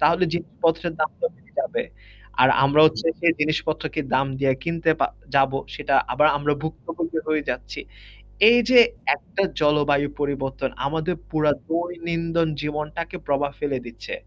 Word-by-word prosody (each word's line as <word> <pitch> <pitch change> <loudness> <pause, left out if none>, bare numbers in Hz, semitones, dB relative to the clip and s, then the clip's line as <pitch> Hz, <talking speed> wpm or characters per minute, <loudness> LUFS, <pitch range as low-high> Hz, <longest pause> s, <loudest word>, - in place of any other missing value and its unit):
তাহলে 170 +4 +4
জিনিসপত্রের 170 0 -1
দামটা 155 - -1
বেড়ে - - -26
যাবে। 485 0 -2 0.6
আর - - +7 0.2
আমরা 145 +2 +4
হচ্ছে 155 - -1
সেই 170 -1 +4
জিনিসপত্রকে 155 +1 -1
দাম 135 +1 +3
দিয়ে 135 -1 +3
কিনতে 165 -1 0
পা - - +4 0.3
যাবো 135 0 +3 0.2
সেটা 145 -2 -1 0.2
আবার 150 +1 +4
আমরা 145 +1 0
ভুক্তভোগী 165 +1 -4
হয়ে 155 -1 +1
যাচ্ছি। 120 -3 -5 0.7
এই 240 +1 +6
যে 255 -1 +8 0.4
একটা 195 - -3 0.2
জলবায়ু 145 -1 +3
পরিবর্তন 135 -2 -2 0.2
আমাদের 160 +4 -2
পুরা 155 -2 +2 0.2
দৈনিন্দন 170 -1 -1
জীবনটাকে 150 +4 -4
প্রভাব 140 0 0
ফেলে 140 -3 -1
দিচ্ছে। 120 - -8
155 Hz, 140 wpm, -23 LUFS, 145-170 Hz, 0.7 s, যে